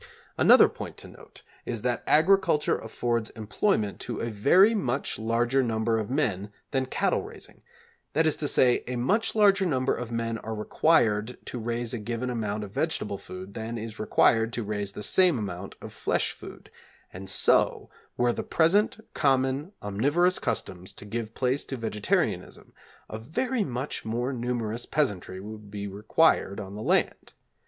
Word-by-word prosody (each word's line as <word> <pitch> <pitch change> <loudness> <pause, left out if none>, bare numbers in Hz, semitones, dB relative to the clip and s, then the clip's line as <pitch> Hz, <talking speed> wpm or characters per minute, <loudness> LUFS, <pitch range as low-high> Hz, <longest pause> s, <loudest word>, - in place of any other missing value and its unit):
Another - - +7
point - - -8
to - - -8
note - - -16 0.2
is 115 -3 -4
that 125 -1 -1
agriculture 165 -1 +3
affords 115 0 -2
employment 110 - -1
to 120 -3 -5
a 115 - -3
very 180 - +5
much 135 - -1
larger 120 +4 +1
number 115 -1 0
of 110 - -4
men 105 -8 -1 0.2
than 130 -1 0
cattle - - 0
raising; - - -11 0.5
that 160 +2 +2
is 155 - +3
to 150 - -2
say, 125 -3 +3
a 125 - -3
much 200 - 0
larger 200 -2 +5
number 135 -7 +1
of 120 -1 -5
men 115 -1 -2
are 110 0 -5
required 110 -1 +2
to 125 - -5
raise 115 +1 -3
a 120 - -3
given 120 +3 -3
amount 105 -3 -2
of 100 - -8
vegetable 105 -7 -2
food 95 0 -9
than 115 +1 -5
is 110 0 -7
required 115 +1 +3
to 120 - -2
raise 105 -1 -3
the 105 - -6
same 180 - +4
amount 100 -3 -5
of - - -8
flesh - - 0
food, - - -12 0.4
and 95 +1 -8
so, - - +2 0.3
were 120 0 +2
the - - -3
present 195 +8 +2
common 135 +4 +1
omnivorous 145 - +1
customs 90 0 -4
to - - -11
give 110 +1 -5
place 130 +2 0
to 135 - -5
vegetarianism, 110 -3 -2 0.3
a 110 - -6
very 225 - -1
much 130 -1 -4
more 120 +4 -2
numerous 120 -2 -3
peasantry 100 - -1
would 105 +1 -9
be 100 0 -5
required 100 +2 +1
on 100 -1 -7
the 105 - -7
land. - - 0
115 Hz, 165 wpm, -27 LUFS, 105-135 Hz, 0.5 s, Another